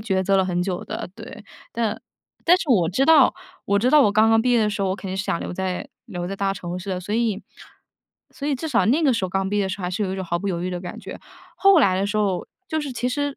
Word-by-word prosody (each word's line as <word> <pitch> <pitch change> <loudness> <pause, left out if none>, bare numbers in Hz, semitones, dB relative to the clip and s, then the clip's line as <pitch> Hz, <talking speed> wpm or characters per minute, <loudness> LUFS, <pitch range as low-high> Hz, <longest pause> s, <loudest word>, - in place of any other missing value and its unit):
抉 190 -3 0
择 195 +1 +2
了 190 - +3
很 180 -1 -1
久 180 -1 -3
的， - - -5
对。 210 - -10 0.3
但 225 -2 -2 0.4
但 355 +2 +6
是 335 - -5
我 175 -8 +4
知 255 +10 +1
道， 305 -4 +6 0.3
我 200 - +1
知 250 +5 +2
道 300 - +7
我 205 - +3
刚 220 +2 +4
刚 225 0 +5
毕 250 +1 +1
业 235 - +4
的 210 -1 +2
时 205 0 -4
候， 195 - +1
我 - - 0
肯 195 - -7
定 190 - -3
是 195 - -2
想 - - -1
留 - - -5
在 185 0 -3 0.2
留 175 0 -5
在 195 - -5
大 195 0 0
城 175 -1 -5
市 190 +2 -6
的。 180 - -2
所 195 +3 -6
以 220 -3 0 0.9
所 285 - -6
以 290 - +1
至 320 +5 -4
少 225 -8 +2
那 290 +8 +3
个 275 -4 +4
时 200 -5 -1
候 - - -2
刚 190 +1 -1
毕 205 - 0
业 200 - +2
的 - - -2
时 190 - -4
候， - - -7
还 180 - -2
是 200 +3 -1
有 190 - -3
一 - - -4
种 190 - -4
毫 175 0 -1
不 200 - -5
犹 175 -2 -2
豫 185 - -2
的 175 -1 -4
感 180 - -8
觉。 - - -8 0.4
后 390 -4 +6
来 185 -6 +3
的 200 - 0
时 210 +1 -2
候， 195 -4 0 0.2
就 315 -1 -1
是 285 -3 -5
其 245 +1 -2
实 285 +2 -2
200 Hz, 330 characters per minute, -23 LUFS, 185-240 Hz, 0.9 s, 道